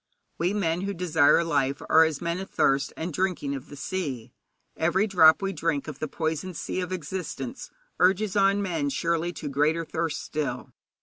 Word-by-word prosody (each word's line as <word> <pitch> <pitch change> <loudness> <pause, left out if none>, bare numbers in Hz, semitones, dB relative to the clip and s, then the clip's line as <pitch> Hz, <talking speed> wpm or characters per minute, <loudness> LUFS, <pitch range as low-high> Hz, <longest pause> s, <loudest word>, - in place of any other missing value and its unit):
We 175 +3 +1
men 175 -4 0
who 200 +1 -3
desire 165 -2 +4
life 140 -4 0
are 160 - +7
as 160 -3 -3
men 170 +1 -2
athirst 140 -7 +1
and 165 +1 -4
drinking 180 -5 -1
of 135 -2 -6
the 145 - -9
sea. 140 -7 -4 0.4
Every 175 +5 +2
drop 180 -4 +5
we 195 0 -1
drink 155 -3 -1
of 150 -3 -7
the 155 - -2
poisoned 160 +3 -3
sea 185 - -3
of 180 0 -5
existence 185 +1 -5 0.3
urges 190 +2 +3
on 200 0 +3
men 165 -7 -1
surely 165 +5 -1
to 155 - -6
greater 150 +4 +1
thirst 160 -1 -3
still. 150 -2 -4
165 Hz, 175 wpm, -26 LUFS, 150-185 Hz, 0.4 s, are